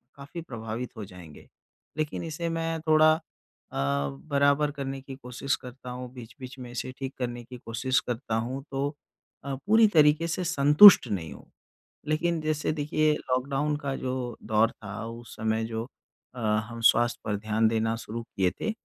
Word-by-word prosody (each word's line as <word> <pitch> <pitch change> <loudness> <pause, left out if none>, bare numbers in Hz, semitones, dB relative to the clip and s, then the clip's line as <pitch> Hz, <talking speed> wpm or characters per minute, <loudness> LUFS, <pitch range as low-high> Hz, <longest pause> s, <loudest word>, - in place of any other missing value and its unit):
काफ़ी 140 +4 -8
प्रभावित 115 -3 -5
हो 105 - -5
जाएँगे। 90 -5 -13 0.5
लेकिन 155 +2 -2
इसे 165 +1 -3
मैं 165 0 -2
थोड़ा 155 0 +6 0.6
अ, - - -6
बराबर 70 - +1
करने 135 -1 -5
की 135 0 -9
कोशिश 130 +1 -2
करता 125 0 -10
हूँ। 125 0 -6
बीच-बीच 125 +2 -10
में 125 -1 -8
इसे 125 +1 -4
ठीक 135 0 -5
करने 120 -1 -3
की 125 +1 -10
कोशिश 125 +3 0
करता 120 -2 -3
हूँ 125 +4 -2
तो 135 +1 -1 0.5
अ, 140 - -4
पूरी 220 +1 +6
तरीके 155 -2 +4
से 175 +2 -2
संतुष्ट 150 +1 +8
नहीं 90 -7 -3
हूँ। - - -14 0.6
लेकिन 165 +2 +1
जैसे 155 0 -1
देखिए, 155 0 +1
लॉकडाउन 135 +3 -1
का 140 -2 -3
जो 130 0 -3 0.3
दौर 110 +1 +2
था 105 +1 -8
उस 115 +1 -9
समय 110 0 0
जो 110 0 -3 0.5
अ, - - -10
हम 110 +1 -1
स्वास्थ्य 120 +1 +4
पर 105 -2 -1
ध्यान 110 +1 +1
देना 115 0 0
शुरू 115 +1 -6
किए 95 -5 0
थे, - - 0
125 Hz, 165 wpm, -27 LUFS, 115-150 Hz, 0.6 s, संतुष्ट